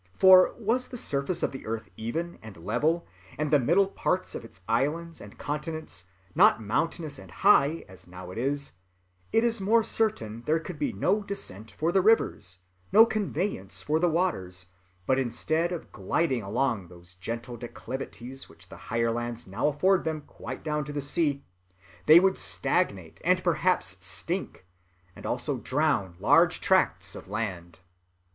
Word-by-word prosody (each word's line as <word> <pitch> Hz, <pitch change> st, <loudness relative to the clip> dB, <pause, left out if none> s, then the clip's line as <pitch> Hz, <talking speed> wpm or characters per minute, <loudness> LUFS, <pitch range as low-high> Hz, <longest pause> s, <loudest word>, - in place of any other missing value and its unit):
For, 185 Hz, -1 st, +7 dB
was 240 Hz, +3 st, 0 dB
the 250 Hz, -, -7 dB
surface 140 Hz, -3 st, -2 dB
of -, -, +1 dB
the 135 Hz, -, -9 dB
earth 110 Hz, -1 st, -3 dB
even 165 Hz, -, -4 dB
and 110 Hz, -4 st, -11 dB
level, 135 Hz, -, 0 dB, 0.3 s
and 150 Hz, -1 st, -1 dB
the 150 Hz, -, +6 dB
middle 170 Hz, +10 st, +4 dB
parts 185 Hz, -1 st, -1 dB
of -, -, -6 dB
its 115 Hz, -4 st, -14 dB
islands 160 Hz, +8 st, -1 dB
and 100 Hz, -, -12 dB
continents 150 Hz, -, -5 dB, 0.3 s
not -, -, +6 dB
mountainous 145 Hz, -, -2 dB
and -, -, -12 dB
high 165 Hz, -5 st, +3 dB
as 95 Hz, -1 st, -14 dB
now 90 Hz, 0 st, -9 dB
it 95 Hz, -, -6 dB
is, 140 Hz, +3 st, -1 dB, 0.6 s
it 225 Hz, -, +3 dB
is 230 Hz, -3 st, +1 dB
most 225 Hz, +3 st, +3 dB
certain 115 Hz, -, -1 dB
there 160 Hz, +2 st, +3 dB
could 165 Hz, -, -8 dB
be 290 Hz, -4 st, 0 dB
no 205 Hz, -1 st, +1 dB
descent 115 Hz, -, -7 dB
for 155 Hz, +12 st, -1 dB
the 190 Hz, -, +4 dB
rivers, 185 Hz, -, +2 dB, 0.3 s
no 220 Hz, +2 st, +8 dB
conveyance 195 Hz, -, -3 dB
for 155 Hz, +2 st, +1 dB
the 175 Hz, +1 st, +3 dB
waters; 95 Hz, -, -1 dB, 0.4 s
but, 130 Hz, +4 st, +2 dB
instead 155 Hz, +7 st, 0 dB
of 175 Hz, -, -6 dB
gliding 125 Hz, -, 0 dB
along 110 Hz, -1 st, -1 dB
those 85 Hz, 0 st, -14 dB
gentle 115 Hz, +7 st, -5 dB
declivities 125 Hz, +2 st, -7 dB
which 85 Hz, +2 st, -16 dB
the -, -, -11 dB
higher 115 Hz, -1 st, +1 dB
lands 120 Hz, 0 st, -4 dB
now 95 Hz, +8 st, -1 dB
afford 185 Hz, +6 st, +2 dB
them 160 Hz, -1 st, -2 dB
quite -, -, -9 dB
down 150 Hz, -1 st, -1 dB
to 145 Hz, -, -7 dB
the 145 Hz, -, -3 dB
sea, 145 Hz, -1 st, 0 dB, 0.6 s
they 155 Hz, +2 st, +10 dB
would 190 Hz, +1 st, +2 dB
stagnate 100 Hz, -, -1 dB
and 180 Hz, +2 st, +2 dB
perhaps 155 Hz, -, 0 dB
stink, 170 Hz, -, -4 dB, 0.5 s
and -, -, -8 dB
also -, -, -1 dB
drown 130 Hz, -, 0 dB
large -, -, +4 dB
tracts -, -, +2 dB
of -, -, -9 dB
land. 95 Hz, -6 st, -4 dB
145 Hz, 165 wpm, -28 LUFS, 110-175 Hz, 0.6 s, they